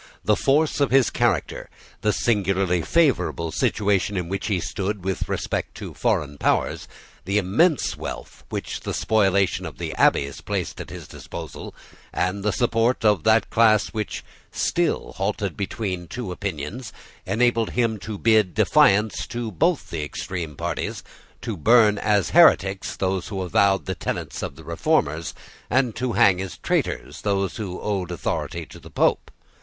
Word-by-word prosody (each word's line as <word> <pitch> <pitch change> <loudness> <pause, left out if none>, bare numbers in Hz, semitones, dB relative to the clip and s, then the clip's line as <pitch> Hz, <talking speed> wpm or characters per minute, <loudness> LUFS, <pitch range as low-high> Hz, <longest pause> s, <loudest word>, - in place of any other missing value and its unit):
The 105 +2 +4
force 150 +6 +2
of 140 - +3
his 135 -2 +4
character, - - 0 0.3
the 105 - +2
singularly 95 -6 +1
favourable 130 - +1
situation 100 +2 +1
in 90 -2 -3
which 100 0 -3
he 100 -4 +1
stood 100 +2 -3
with 95 -1 -2
respect - - -3
to - - -7
foreign 75 -1 -1
powers, - - 0 0.4
the 100 +3 0
immense 125 - +2
wealth - - -8
which - - -4
the - - -4
spoliation 100 -3 +2
of - - -7
the - - -4
abbeys 70 0 +2
placed - - -3
at - - -9
his - - -9
disposal, - - -8 0.4
and 90 +3 -1
the 105 +1 +1
support 115 +2 +1
of 105 -6 +3
that 110 0 +3
class 110 -2 +4
which 110 -1 -4 0.3
still - - -1
halted 100 -1 -2
between 95 -3 -4
two 115 0 -5
Opinions, 100 - -5 0.4
enabled 115 0 +2
him 115 -3 0
to 105 +1 -6
bid 110 -5 +3
defiance 105 +2 +3
to 120 -4 -4
both 165 - 0
the 80 - -3
extreme 80 +1 -5
parties, - - -3 0.4
to 115 - -3
burn 105 +4 +4
as 105 -2 +1
heretics 100 - +4
those 95 -1 -1
who 95 -3 -4
avowed 100 +1 +2
the 95 - -2
tenets 85 - -4
of - - -5
the 80 - -13
Reformers, 80 -2 0 0.3
and 130 -3 +1
to 125 -2 -1
hang 95 -2 +4
as 95 -2 -6
traitors - - -2
those 100 -3 -1
who 95 -5 -5
owned 100 -4 -2
the 90 - -5
authority 85 0 -3
of 85 - -12
the 80 - -12
Pope. - - +1
100 Hz, 160 wpm, -23 LUFS, 90-110 Hz, 0.4 s, The